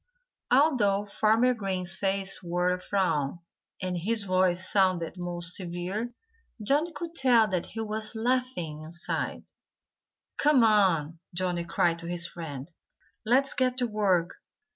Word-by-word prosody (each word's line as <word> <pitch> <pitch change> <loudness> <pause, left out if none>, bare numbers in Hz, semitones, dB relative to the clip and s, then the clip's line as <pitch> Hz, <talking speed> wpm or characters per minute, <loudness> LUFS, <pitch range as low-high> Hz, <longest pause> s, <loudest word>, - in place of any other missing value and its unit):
Although 245 -8 +3
Farmer 220 +4 +3
Green's 190 -5 -1
face 195 0 0
wore 180 +1 0
a 180 - -5
frown, 175 -8 0 0.5
and 185 -1 -1
his 210 +5 -1
voice 185 -1 +2
sounded 185 -4 +2
most 175 -1 -4
severe, 185 +6 -4 0.5
Johnnie 285 +10 +1
could 335 0 -6
tell 245 -7 +4
that 180 -3 -1
he 225 - -6
was 215 0 -3
laughing, 225 -10 -1
inside. 170 +3 -4 1.0
"Come 290 -5 +5
on!" 180 -8 +3 0.2
Johnnie 175 -1 -1
cried 170 0 +1
to 170 - -8
his 175 -1 -1
friends. 155 -3 -7 0.6
"Let's 270 +4 +4
get 255 -1 0
to 250 - +1
work. 195 -6 0
190 Hz, 130 wpm, -28 LUFS, 175-225 Hz, 1.0 s, Come